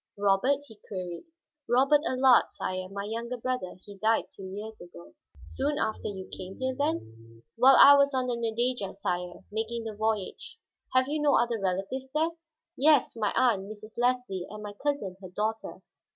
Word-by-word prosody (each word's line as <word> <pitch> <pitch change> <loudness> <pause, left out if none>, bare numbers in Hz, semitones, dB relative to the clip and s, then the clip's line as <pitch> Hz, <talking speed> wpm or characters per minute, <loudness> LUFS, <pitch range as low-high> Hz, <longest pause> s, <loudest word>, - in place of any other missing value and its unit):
"Robert?" 205 +8 +2
he 220 -6 -15
queried. 185 - -6 0.4
"Robert 275 +4 +4
Allard, 260 -1 +5
sire, 185 0 -4
my 200 +1 -5
younger 230 +4 -4
brother. 250 -6 -3
He 205 - -10
died 220 +2 +1
two 190 -1 -9
years 210 +3 -7
ago." 85 - -13 0.3
"Soon 280 - -2
after 220 -8 -2
you 190 -2 -6
came 185 +1 -8
here, 260 0 -1
then?" 115 - -4
"While 260 +3 +7
I 280 - +11
was 280 0 +4
on 260 -2 0
the 245 -1 -1
Nadeja, 235 -3 -1
sire, 180 -2 -3
making 225 +2 -2
the 220 -1 -5
voyage." 215 -2 -3 0.4
"Have 255 0 +4
you 300 +1 -1
no 295 -1 +4
other 235 -1 +1
relatives 195 +8 -3
there?" 315 +2 +2 0.5
"Yes; 295 -2 +4
my 215 -3 0
aunt, 210 -6 +2
Mrs. 215 +1 -11
Leslie, 245 -7 0
and 210 +1 -8
my 205 -1 -6
cousin, 205 -6 -3
her 185 - -9
daughter." 215 +4 -3
220 Hz, 170 wpm, -28 LUFS, 195-255 Hz, 0.5 s, I